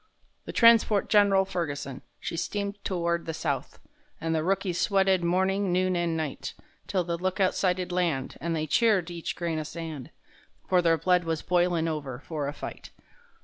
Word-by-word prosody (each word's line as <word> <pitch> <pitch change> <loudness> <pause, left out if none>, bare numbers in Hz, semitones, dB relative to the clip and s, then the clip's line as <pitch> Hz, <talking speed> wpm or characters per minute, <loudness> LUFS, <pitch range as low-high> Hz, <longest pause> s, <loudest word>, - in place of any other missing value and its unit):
The - - -5
transport 230 -3 +5
Gen'ral 200 -2 +5
Ferguson, 145 -8 -4 0.2
she - - -4
steamed 200 +3 -3
to 185 - -1
ward 170 0 -1
the 160 - -3
south, 145 -4 -3 0.4
And 165 0 -1
the 160 -1 0
rookies 185 -1 0
sweated 190 -2 +3
morning, 190 +2 +1
noon 185 +1 +2
and 170 -2 0
night; 155 -4 -4 0.3
'Till 185 -2 0
the 170 0 -3
lookout 185 +1 +1
sighted 180 -1 0
land, 170 -7 -1
and 165 +2 -1
they 155 -1 -1
cheered 185 +1 +2
each 170 -1 -4
grain 170 -2 -2
o' - - -2
sand,— 155 -4 -7 0.6
For 180 -1 +4
their 165 -1 +3
blood 180 +2 +2
was 165 -1 -2
boilin' 175 -2 +2
over 145 -6 -3
for 150 -1 -4
a - - -2
fight. - - -8
175 Hz, 175 wpm, -27 LUFS, 160-190 Hz, 0.6 s, transport